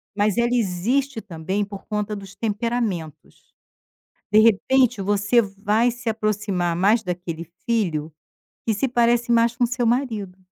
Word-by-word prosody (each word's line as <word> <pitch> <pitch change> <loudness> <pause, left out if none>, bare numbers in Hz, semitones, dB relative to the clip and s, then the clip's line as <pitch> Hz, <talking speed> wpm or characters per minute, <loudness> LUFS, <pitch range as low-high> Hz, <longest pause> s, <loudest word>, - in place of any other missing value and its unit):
mas 210 +1 +1
ela 235 0 +2
existe 235 +5 0
também 190 +2 -3
por 200 -1 -10
conta 210 -1 -2
dos 195 -1 -10
temperamentos. 215 - -3 0.8
De 210 - +5
repente 230 +2 +3
você 205 +4 +3
vai 205 +3 +1
se 240 0 -6
aproximar 210 -5 -1
mais 205 +6 +3
daquele 175 -3 -5 0.2
filho 170 -10 0 0.5
que 225 - +1
se 240 +6 0
parece 240 -1 +2
mais 235 0 +3
com 245 - 0
o 240 - +4
seu 245 0 -1
marido. 225 -7 -1
215 Hz, 145 wpm, -23 LUFS, 195-235 Hz, 0.8 s, De